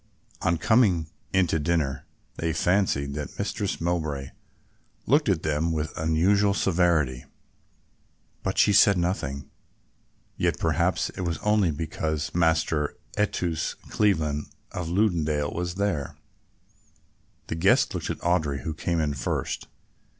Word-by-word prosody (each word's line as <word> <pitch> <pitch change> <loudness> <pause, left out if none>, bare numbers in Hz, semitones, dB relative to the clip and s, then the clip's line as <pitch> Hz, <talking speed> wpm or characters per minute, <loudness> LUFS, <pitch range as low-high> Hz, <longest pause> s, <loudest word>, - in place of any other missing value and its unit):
On 85 0 +2
coming 90 -7 +3 0.2
in 95 -1 +4
to 80 -1 0
dinner 75 -4 -1 0.3
they 80 -1 -1
fancied 80 -5 +1
that 75 0 -6
Mistress - - -2
Mowbray 80 -5 -2 0.8
looked 145 +1 +3
at 90 -5 +1
them 80 +2 0
with 80 -1 -2
unusual 95 +6 +2
severity, 85 -10 +1 1.2
but - - -2
she 105 - +5
said 100 -1 +6
nothing, 70 -6 -2 0.9
yet - - +1
perhaps - - +1
it - - -7
was 85 -2 -1
only 105 -4 +3
because 80 -1 -3
Master 80 -3 +1 0.2
Eustace 90 -6 -1 0.2
Cleveland 80 -8 +1 0.2
of 85 -2 -4
Lunedale 80 -7 +1
was 85 +1 -3
there. 95 -8 -2 1.3
The - - -4
guest 80 - +3
looked - - -4
at - - -2
Audry, 80 -5 0
who 80 - -3
came 85 +1 -1
in 75 -2 0
first. 70 - -3
80 Hz, 125 wpm, -26 LUFS, 75-90 Hz, 1.3 s, said